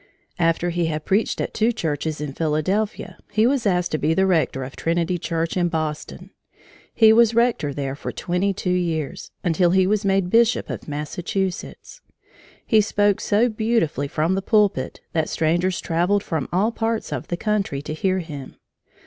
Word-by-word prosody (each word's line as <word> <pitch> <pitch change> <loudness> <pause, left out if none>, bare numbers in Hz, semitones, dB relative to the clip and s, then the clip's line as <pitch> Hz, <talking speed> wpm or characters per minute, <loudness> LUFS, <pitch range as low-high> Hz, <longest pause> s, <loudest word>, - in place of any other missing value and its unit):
After 170 +1 +1
he 170 -1 0
had 155 -1 -3
preached 205 +4 +1
at - - -3
two 225 +2 +2
churches 155 - -3
in 150 -2 -4
Philadelphia, 165 +8 -1
he 215 +1 +3
was 250 -3 +2
asked 180 -2 +1
to 155 - -1
be 160 +2 +1
the 190 - +3
rector 160 -7 +1
of 130 +1 -8
Trinity 170 +2 0
Church 165 0 -2
in 175 -1 +2
Boston. 155 -2 -4 0.6
He 220 -1 +6
was 230 0 +4
rector 235 -11 +2
there 135 -1 -3
for - - -5
twenty 180 +3 -1
two 185 -1 -2
years 170 -2 -2
until 175 0 +2
he 190 +1 +4
was 210 +2 +1
made 195 -2 +1
Bishop 230 +1 +3
of - - -7
Massachusetts. 175 +5 -4 0.6
He 220 -3 +4
spoke 205 -1 +1
so 215 +4 +2
beautifully 220 - 0
from 155 +5 0
the 195 - 0
pulpit 200 - +1
that 160 -2 0
strangers 175 +3 0
traveled 180 +5 +1
from 160 -6 -3
all 200 +6 +2
parts 225 -1 -2
of - - -5
the 175 - -3
country 200 -9 -1
to 155 - -5
hear 185 +4 0
him. 150 -7 -7
180 Hz, 175 wpm, -22 LUFS, 160-205 Hz, 0.6 s, He